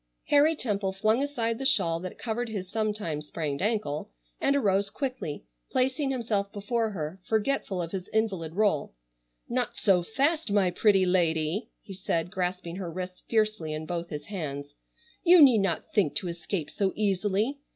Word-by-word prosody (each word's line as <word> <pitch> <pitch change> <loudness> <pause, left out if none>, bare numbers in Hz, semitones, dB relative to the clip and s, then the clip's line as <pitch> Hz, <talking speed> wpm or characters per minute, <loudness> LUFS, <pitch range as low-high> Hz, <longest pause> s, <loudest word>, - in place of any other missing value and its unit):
Harry 295 +3 +5
Temple 205 -8 -1
flung 215 +5 +2
aside 235 -6 -1
the - - -3
shawl 165 -11 +3
that 185 +1 -7
covered 235 +1 -3
his 190 -4 -5
sometime 210 -8 -1
sprained 150 -2 -4
ankle 205 - -1 0.3
and 280 - +2
arose 200 -6 +2
quickly, 255 - -4 0.3
placing 260 +2 +1
himself 220 -6 -1
before 220 +3 -1
her, 175 -1 -5
forgetful 220 -3 0
of 165 - -6
his 190 -2 -4
invalid 195 -8 -1
rôle: 195 - +1 0.5
"Not 245 -1 -1
so 190 -3 +4
fast, 280 - 0
my 195 -3 +3
pretty 195 0 +4
lady," 170 +1 +1
he 195 - -9
said, 175 -2 -2
grasping 180 -2 -3
her 185 -3 -4
wrists 180 +1 -6
fiercely 215 -8 +1
in 155 +1 -4
both 170 +1 -4
his 150 -1 -6
hands. 145 -7 -5 0.5
"You 355 0 +8
need 260 -7 +8
not 195 -5 -1
think 190 -9 +2
to 185 - -1
escape 170 -1 -4
so 195 -2 0
easily. 205 +6 0
200 Hz, 160 wpm, -28 LUFS, 170-225 Hz, 0.5 s, You